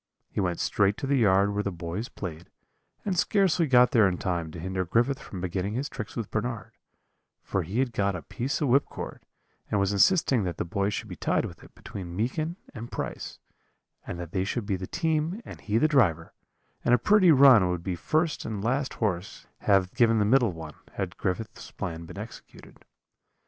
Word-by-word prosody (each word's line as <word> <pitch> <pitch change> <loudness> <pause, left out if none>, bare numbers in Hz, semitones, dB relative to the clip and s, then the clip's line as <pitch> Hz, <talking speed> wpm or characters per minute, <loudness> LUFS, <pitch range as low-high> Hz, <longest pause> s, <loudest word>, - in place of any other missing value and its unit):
He - - -3
went 90 -3 0
straight 100 0 +2
to - - -4
the 140 0 +2
yard 100 -2 +4
where 105 - 0
the 100 - -2
boys 90 +7 -5
played, 85 -8 -7 0.6
and 195 -3 0
scarcely 185 -3 +2
got 125 -2 +6
there 110 -4 +5
in 90 -2 -1
time 85 -3 -2
to 80 - -9
hinder 95 +2 -2
Griffith 120 +9 +1
from 95 - -8
beginning 95 +3 -2
his 135 +4 -2
tricks 110 -4 -7
with 115 -4 -4
Bernard, 110 +1 -3 0.7
for 95 - -1
he 90 +7 -4
had 130 -2 +1
got 100 -2 0
a 85 - -6
piece 130 - -3
of 145 - +1
whipcord, 140 +3 0 0.5
and 105 - +1
was 100 +1 +1
insisting 130 - +4
that 90 -3 -3
the - - -2
boy 100 +3 0
should 105 - -4
be - - -7
tied - - 0
with - - -9
it - - -17
between 90 -3 -8
Meekin 155 - -1 0.2
and 120 -2 -8
Price, - - -5 0.7
and 85 - -5
that 85 -2 -6
they 95 0 0
should 105 +3 -2
be 100 -1 0
the 90 0 -5
team 160 +3 -1
and - - -10
he 105 +1 0
the 155 - +4
driver; 95 - +2 0.5
and 120 - +5
a - - +3
pretty 190 - +5
run 130 - +7
would 90 -1 -2
the 95 - -2
first 155 - 0
and 105 -3 -4
last 130 +4 0
horse 100 -1 -2
have 95 -3 +2
given 115 -3 +4
the 105 - +3
middle 120 -1 +4
one, 80 -2 -8 0.2
had - - -4
Griffith's 100 +4 -4
plan 85 -1 -6
been - - -10
executed. 110 +3 -11
105 Hz, 200 wpm, -27 LUFS, 90-130 Hz, 0.7 s, run